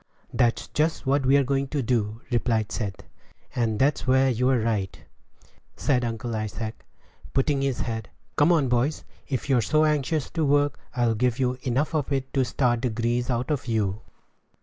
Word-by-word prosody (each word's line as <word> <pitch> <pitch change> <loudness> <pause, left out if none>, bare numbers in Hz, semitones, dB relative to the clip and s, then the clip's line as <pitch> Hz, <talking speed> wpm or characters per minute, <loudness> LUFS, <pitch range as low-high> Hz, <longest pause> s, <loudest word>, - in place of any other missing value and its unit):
"That's 120 -1 +1
just 160 +1 0
what 135 0 +2
we're 140 +1 +5
going 135 +1 0
to 140 0 -2
do," 110 -2 -1
replied 115 -2 +1
Seth. 100 -5 -4 0.5
"And 115 -3 0
that's 135 +2 +1
where 130 +1 +4
you're 125 +2 +2
right," 110 -4 -1 0.8
said 125 -4 +1
Uncle 115 0 -3
Isaac, 110 +1 -4 0.5
putting 140 +1 +2
on - - -1
his 135 -2 -1
hat. 110 -3 -3 0.3
"Come 145 +4 +4
on, 155 -6 +3
boys; 125 +5 0 0.2
if 130 -2 -3
you're 130 -4 +3
so 155 +7 +3
anxious 150 0 0
to 165 - -1
work, 145 0 +2 0.2
I'll 120 -2 +2
give 120 +1 +1
you 125 -1 0
enough 135 +5 0
of 150 -3 -1
it 135 -1 -2
to 135 - +3
start 120 -2 +1
the 125 - 0
grease 120 +2 -1
out 125 +3 -1
of 140 -4 -2
you." 105 -3 0
125 Hz, 175 wpm, -25 LUFS, 115-140 Hz, 0.8 s, we're